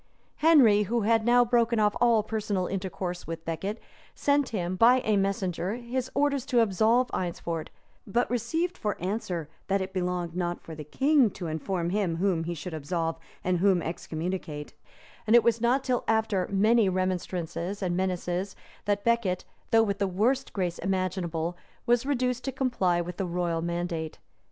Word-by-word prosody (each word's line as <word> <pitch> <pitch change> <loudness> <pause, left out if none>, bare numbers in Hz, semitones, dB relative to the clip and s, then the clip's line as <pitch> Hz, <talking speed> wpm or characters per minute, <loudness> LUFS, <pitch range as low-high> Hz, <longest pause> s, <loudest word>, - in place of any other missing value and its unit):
Henry, 270 -10 +6
who 235 0 +1
had 225 +1 +3
now 245 +1 +5
broken 235 -1 +2
off 210 -1 +3
all 230 -3 +4
personal 210 -4 -2
intercourse 185 -1 -4
with 165 0 -6
Becket, 190 +7 -3 0.4
sent 285 -2 +2
him, 185 -4 -2
by 245 +6 +5
a 215 -3 +1
messenger, 195 -1 -1
his 250 +1 -3
orders 280 -2 +1
to 245 -3 +3
absolve 225 +4 +2
Eynsford; 170 -2 -3 0.4
but 235 +5 +1
received 320 +10 -1
for 210 -1 -2
answer, 180 -4 -3 0.2
that 195 0 +2
it 190 0 -4
belonged 180 -2 -2
not 175 -1 -2
for 165 - -10
the 155 -1 -7
king 270 - +3
to 185 - -8
inform 170 +2 -2
him 195 -4 0
whom 170 -2 0
he 170 +1 -3
should 165 +2 -7
absolve 165 +2 -2 0.2
and 180 -1 +1
whom 190 -1 +4
excommunicate; 165 -2 -4 0.5
and 220 - +5
it 240 - +7
was 230 -1 +2
not 250 +3 +2
till 250 -2 0
after 220 -4 +1
many 215 +2 +4
remonstrances 185 0 -2
and 175 -2 0
menaces 185 +1 -2 0.3
that 205 0 0
Becket, 235 -6 +1 0.2
though 225 0 +5
with 200 -2 -2
the 200 - +1
worst 235 +9 0
grace 180 -4 -2
imaginable, 180 -3 -2 0.3
was 240 0 +3
induced 255 -3 0
to 270 - -1
comply 240 -10 +1
with 175 0 -6
the 190 - -2
royal 170 -1 -1
mandate. 170 -2 -3
195 Hz, 165 wpm, -28 LUFS, 175-235 Hz, 0.5 s, it